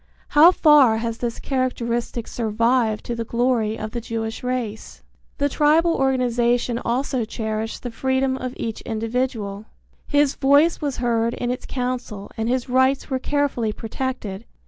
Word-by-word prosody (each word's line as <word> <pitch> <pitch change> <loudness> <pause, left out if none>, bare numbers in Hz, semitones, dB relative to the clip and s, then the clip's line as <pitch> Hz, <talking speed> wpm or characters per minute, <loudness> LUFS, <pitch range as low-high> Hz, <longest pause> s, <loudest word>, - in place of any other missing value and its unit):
How 315 +4 +7
far 295 -10 +5
has 230 0 -3
this 235 -1 -3
characteristic 240 -3 -2
survived 230 0 0
to 240 - -3
the 230 -1 -3
glory 235 -2 0
of 215 0 -5
the 235 - -4
Jewish 225 -1 -4
race? 250 -4 -4 0.3
The 285 - +2
tribal 310 +4 +3
organization 245 -3 +1
also 255 +1 -1
cherished 220 0 -4
the 245 - -4
freedom 260 +2 0
of 255 -1 -5
each 225 -2 -4
individual. 225 -2 -3 0.4
His 290 -1 +3
voice 285 +5 +3
was 285 -3 -2
heard 235 -1 0
in 245 0 -2
its 250 - -5
council 245 -5 -4
and 225 +1 -2
his 255 0 0
rights 260 +2 +2
were 260 - 0
carefully 275 -6 0
protected. 225 -2 -5
245 Hz, 145 wpm, -22 LUFS, 225-265 Hz, 0.4 s, How